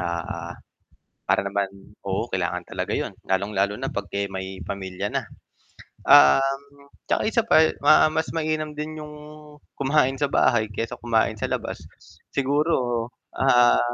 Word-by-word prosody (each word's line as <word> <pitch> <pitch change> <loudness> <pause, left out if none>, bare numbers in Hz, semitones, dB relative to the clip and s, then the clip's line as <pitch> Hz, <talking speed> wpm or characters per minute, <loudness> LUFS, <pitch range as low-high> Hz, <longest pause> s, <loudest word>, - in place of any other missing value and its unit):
ah, 85 -1 -4 0.7
para - - +3
naman 100 0 -1 0.4
oo, 100 +3 -1
kailangan 95 -1 -2
talaga - - -3
'yon - - -3 0.2
lalong-lalo 100 +1 0
na 135 - -2
'pag, 100 - -4
eh, 100 - 0
may 95 0 -6
pamilya 95 -1 -4
na. - - -1 0.8
Um, 140 - +4 0.2
'tsaka - - +1
isa 230 - +2
pa, - - +5 0.3
ma 155 +1 +6
mas 160 0 -1
mainam 155 -1 -1
din 155 +1 -5
'yong 150 0 -9 0.6
kumain 135 -1 +2
sa 145 - +2
bahay, 110 -3 +3
kaysa 115 +3 -4
kumain 115 -1 +1
sa - - -1
labas, - - -3 0.6
siguro, 135 -4 +1 0.3
ah 120 -2 +5
120 Hz, 140 wpm, -24 LUFS, 100-145 Hz, 0.8 s, ma